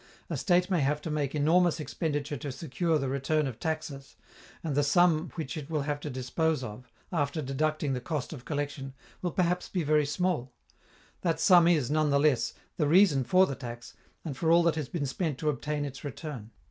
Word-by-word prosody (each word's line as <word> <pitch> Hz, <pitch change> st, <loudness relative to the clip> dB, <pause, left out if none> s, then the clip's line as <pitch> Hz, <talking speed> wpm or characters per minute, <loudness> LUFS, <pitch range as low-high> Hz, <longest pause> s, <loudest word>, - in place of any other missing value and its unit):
A -, -, 0 dB
state 180 Hz, -1 st, +2 dB
may 180 Hz, -, +3 dB
have 145 Hz, +2 st, +1 dB
to 160 Hz, -, -4 dB
make 145 Hz, -2 st, -1 dB
enormous 165 Hz, +3 st, +3 dB
expenditure 150 Hz, -1 st, -2 dB
to 140 Hz, +2 st, -5 dB
secure 160 Hz, +4 st, -1 dB
the 135 Hz, -2 st, -2 dB
return 140 Hz, +3 st, 0 dB
of 130 Hz, -5 st, -5 dB
taxes, 155 Hz, -4 st, -4 dB, 0.5 s
and 160 Hz, -3 st, -2 dB
the 145 Hz, -, +3 dB
sum 165 Hz, +2 st, +3 dB
which 160 Hz, -2 st, -4 dB
it 150 Hz, -2 st, -6 dB
will 155 Hz, -3 st, -1 dB
have 145 Hz, 0 st, -2 dB
to 150 Hz, -, -5 dB
dispose 140 Hz, +3 st, -1 dB
of, 125 Hz, +2 st, -8 dB, 0.2 s
after 145 Hz, -3 st, 0 dB
deducting 150 Hz, +1 st, -1 dB
the 125 Hz, -, -3 dB
cost 150 Hz, +1 st, -3 dB
of 130 Hz, -5 st, -9 dB
collection, 145 Hz, -2 st, -4 dB, 0.3 s
will 180 Hz, -, 0 dB
perhaps 180 Hz, +1 st, 0 dB
be 180 Hz, -3 st, -1 dB
very 150 Hz, -1 st, +3 dB
small: 150 Hz, -5 st, -1 dB, 0.7 s
that 165 Hz, -3 st, 0 dB
sum 175 Hz, -3 st, +6 dB
is, 150 Hz, -6 st, +2 dB
none 155 Hz, 0 st, +2 dB
the 140 Hz, -, +3 dB
less, 130 Hz, -6 st, +2 dB, 0.2 s
the 150 Hz, -, +2 dB
reason 165 Hz, -4 st, +5 dB
for 185 Hz, +10 st, +5 dB
the 140 Hz, -, -3 dB
tax 120 Hz, -3 st, -8 dB, 0.3 s
and 150 Hz, -5 st, -4 dB
for 160 Hz, +4 st, 0 dB
all 170 Hz, +1 st, +6 dB
that 170 Hz, -1 st, +3 dB
has 155 Hz, -4 st, -4 dB
been 160 Hz, -5 st, -2 dB
spent 145 Hz, +1 st, -2 dB
to 155 Hz, +3 st, 0 dB
obtain 150 Hz, +1 st, -2 dB
its 135 Hz, -1 st, -8 dB
return. 140 Hz, -6 st, -6 dB
150 Hz, 205 wpm, -29 LUFS, 135-165 Hz, 0.7 s, sum